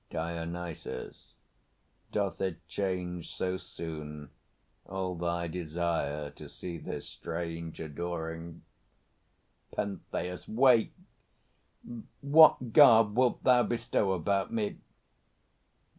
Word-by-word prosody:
DIONYSUS. 85 +1 -5 0.8
Doth 100 -4 -1
it 90 -4 -3
change 90 -2 -3
So 95 0 -1
soon, 75 -5 -7 0.6
all 95 -1 -2
thy 85 0 -2
desire 80 -3 -2
to - - -11
see 85 -2 -6
this - - -6
strange 85 -1 -5
Adoring? 80 +1 -5 1.1
PENTHEUS. 90 -2 -4
Wait! 120 0 +4 1.3
What 140 -5 +6
garb 115 -7 +8
wilt 125 0 +2
thou 125 -1 +6
bestow 115 -5 0
About 95 +3 0
me? 110 -3 -2
90 Hz, 85 wpm, -30 LUFS, 85-100 Hz, 1.3 s, garb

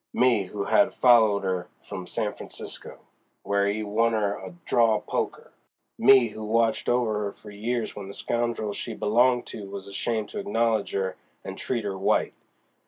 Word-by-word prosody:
—me 120 -5 +3
who 100 +2 -4
had 100 - +3
followed 110 -5 +5
'er 90 -2 -1 0.2
from 90 -1 -7
San - - -2
Francisco, - - -7 0.5
where 100 0 +1
'e 105 +2 -1
won 115 +2 +1
'er 105 -2 0
at 175 -1 -11
draw 115 -3 +3
poker!—me 120 +3 +1
who 110 - -9
had 105 - -5
watched 115 -1 +2
over 110 -4 +1
'er - - -5
for 105 - -13
years 115 +3 -2
w'en 100 -2 -8
the 100 - -8
scoundrel 120 -3 -1
she - - -5
belonged 120 +3 +3
to 100 -2 -8
was 100 0 -7
ashamed 110 +2 -2
to 205 - -6
acknowledge 115 - 0
'er 95 -1 -1 0.3
and - - -5
treat 120 -4 -2
'er 100 -1 -2
white! 95 - +1
110 Hz, 170 wpm, -26 LUFS, 100-120 Hz, 0.5 s, followed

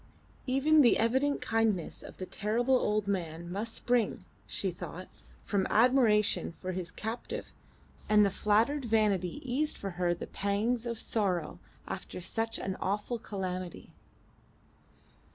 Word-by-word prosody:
Even 290 +4 +5
the 240 - +6
evident 265 +5 +2
kindness 220 -6 0
of - - -11
the 185 - -4
terrible 230 +7 +1
old 210 -4 +2
man 170 -3 -3
must 215 +4 -3
spring, 235 -6 0 0.2
she 190 - -2
thought, 180 +1 -8 0.4
from 195 -2 0
admiration 215 -7 +3
for 185 +2 -5
his 180 -2 -4
captive, 225 +5 -5 0.6
and 210 -1 +6
the 200 - +1
flattered 225 +9 +2
vanity 210 -2 +1
eased 290 +5 0
for 195 - -4
her 175 -1 +2
the - - -6
pangs 220 +4 -1
of 235 -1 -3
sorrow 185 -7 0 0.3
after - - -6
such 225 +5 -2
an 190 0 -3
awful 205 +5 -1
calamity. 185 -4 -5
210 Hz, 135 wpm, -31 LUFS, 185-235 Hz, 0.6 s, the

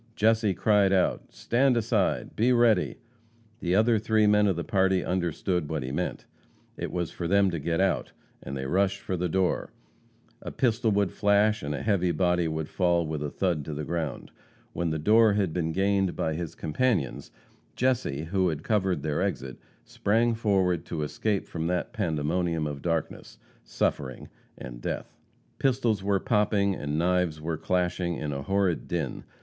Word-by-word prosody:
Jesse 110 -2 +2
cried 105 -3 +3
out: 95 -2 +1
"Stand 120 - +1
aside! 110 -3 0
Be 120 +4 +3
ready!" 115 -6 +3 0.6
The 90 +1 0
other 110 +2 +4
three 110 0 +2
men 105 0 +4
of 95 - +1
the 85 - -3
party 95 -4 +1
understood 90 -2 -1
what 80 -4 -2
he 65 - -4
meant. - - -3 0.5
It - - -5
was 90 -2 -2
for 85 - -4
them 100 +1 +3
to 85 - -3
get 80 +3 -1
out, 95 - +1 0.3
and 70 +1 -6
they 65 - -4
rushed 95 +6 +1
for 95 - -3
the 90 0 -1
door. 95 +1 0 0.7
A - - -6
pistol 115 -2 +1
would 100 -3 +1
flash 105 +1 +2
and 75 0 -3
a - - -5
heavy 95 -5 +2
body 90 +1 +1
would 80 -1 -3
fall 85 -1 +1
with 75 -1 -4
a 75 - -2
thud 85 -2 -1
to 75 - -5
the 75 - -4
ground. 80 -3 -4 0.4
When 85 -1 -1
the 80 - -1
door 110 +7 +5
had 100 -5 0
been 80 -2 -1
gained 95 0 +1
by 80 - -1
his 85 0 -5
companions, 95 - -1 0.5
Jesse, 125 - 0
who 95 +2 0
had 80 -3 -3
covered 95 -4 0
their 75 -2 -1
exit, 65 -1 -3 0.3
sprang 115 +3 +1
forward 95 -6 +1
to 80 -3 -3
escape 100 +7 -1
from 80 -1 -4
that 90 +6 -2
pandemonium 85 -4 -1
of 70 -2 -5
darkness, 85 -3 -3 0.3
suffering 65 -2 -2 0.3
and - - -9
death. - - -5 0.4
Pistols 120 -6 +1
were 100 0 +1
popping 105 -4 +1
and 75 -4 -3
knives 90 -2 +1
were 80 +1 -3
clashing 90 +1 -1
in 75 -2 -4
a 70 - -4
horrid 95 +2 0
din. - - -3
90 Hz, 175 wpm, -27 LUFS, 80-105 Hz, 0.7 s, door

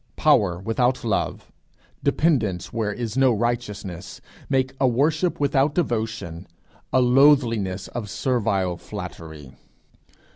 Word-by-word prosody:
Power 90 -4 +3
without 120 +6 0
love, 110 -4 -2 0.5
dependence 110 - +1
where 110 -2 -1
is 115 +1 -4
no 135 -1 +4
righteousness, 105 -6 -3 0.3
wake 130 -1 +1
a 135 - +4
worship 155 +8 +1
without 140 0 +2
devotion, 110 - -2 0.4
a 130 - +4
loathliness 120 -8 +3
of 115 -4 -5
servile 100 -8 0
flattery. 80 -6 -9
115 Hz, 105 wpm, -23 LUFS, 95-135 Hz, 0.5 s, no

